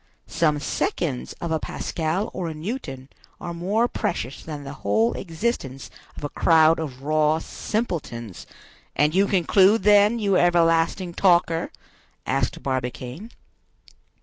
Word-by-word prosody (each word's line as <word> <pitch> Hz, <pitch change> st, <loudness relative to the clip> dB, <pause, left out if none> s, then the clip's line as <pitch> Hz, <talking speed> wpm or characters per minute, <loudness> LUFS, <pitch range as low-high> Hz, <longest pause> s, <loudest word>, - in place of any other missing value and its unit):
Some 150 Hz, -3 st, +1 dB
seconds 65 Hz, -, -2 dB
of 170 Hz, -, -6 dB
a 160 Hz, -, +1 dB
Pascal 165 Hz, +8 st, -3 dB
or 180 Hz, -2 st, -3 dB
a 160 Hz, -, -5 dB
Newton 155 Hz, -, -6 dB, 0.3 s
are 170 Hz, -, -5 dB
more 200 Hz, +8 st, +1 dB
precious 170 Hz, -, -3 dB
than 150 Hz, -3 st, -7 dB
the 140 Hz, 0 st, -7 dB
whole 110 Hz, +4 st, +2 dB
existence 160 Hz, -, -4 dB, 0.3 s
of -, -, -9 dB
a 145 Hz, -, -2 dB
crowd 160 Hz, +1 st, +4 dB
of 135 Hz, -5 st, -6 dB
raw 155 Hz, +1 st, +2 dB
simpletons—" 160 Hz, -, -4 dB, 0.5 s
"And 150 Hz, +1 st, +2 dB
you 195 Hz, +2 st, +3 dB
conclude, 195 Hz, +3 st, +4 dB
then, 210 Hz, +2 st, +5 dB
you 200 Hz, -4 st, +2 dB
everlasting 170 Hz, +1 st, +2 dB
talker?" 170 Hz, -3 st, +2 dB, 0.5 s
asked 135 Hz, -2 st, -1 dB
Barbicane. 130 Hz, -, -4 dB
165 Hz, 125 wpm, -24 LUFS, 140-190 Hz, 0.5 s, then